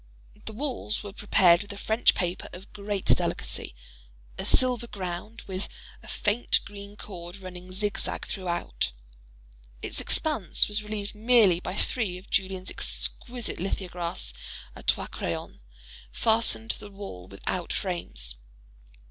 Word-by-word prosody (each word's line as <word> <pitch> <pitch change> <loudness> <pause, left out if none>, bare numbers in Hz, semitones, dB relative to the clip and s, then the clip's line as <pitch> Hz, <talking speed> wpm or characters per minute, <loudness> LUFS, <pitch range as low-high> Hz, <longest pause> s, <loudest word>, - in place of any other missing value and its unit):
The 220 - -4
walls 250 -4 -1
were 205 -2 -7
prepared 180 -4 +6
with 205 - -7
a - - -9
French 220 +3 +4
paper 180 0 -1
of 185 +3 -10
great 205 -1 -2
delicacy, - - +1 0.6
a - - -3
silver 250 -2 +4
ground, 190 +3 -5
with 190 0 -3 0.3
a - - -14
faint 215 +4 +2
green 200 0 -9
cord 175 -3 -7
running 185 -1 -9
zig 205 +2 0
zag - - -2
throughout. 175 - -1 0.9
Its - - +1
expanse 295 - +3
was 210 0 +1
relieved 210 -1 -4
merely 215 -5 +6
by 185 - -4
three 205 -5 0
of 185 - -14
Julien's 190 -1 0
exquisite 245 -2 0
lithographs 175 - -2 0.4
a - - -9
trois - - +2
crayons, - - -4 0.5
fastened 225 0 +2
to - - -1
the 205 - -8
wall 195 - -8
without 160 - -3
frames. 170 - -2
200 Hz, 135 wpm, -28 LUFS, 180-215 Hz, 0.9 s, prepared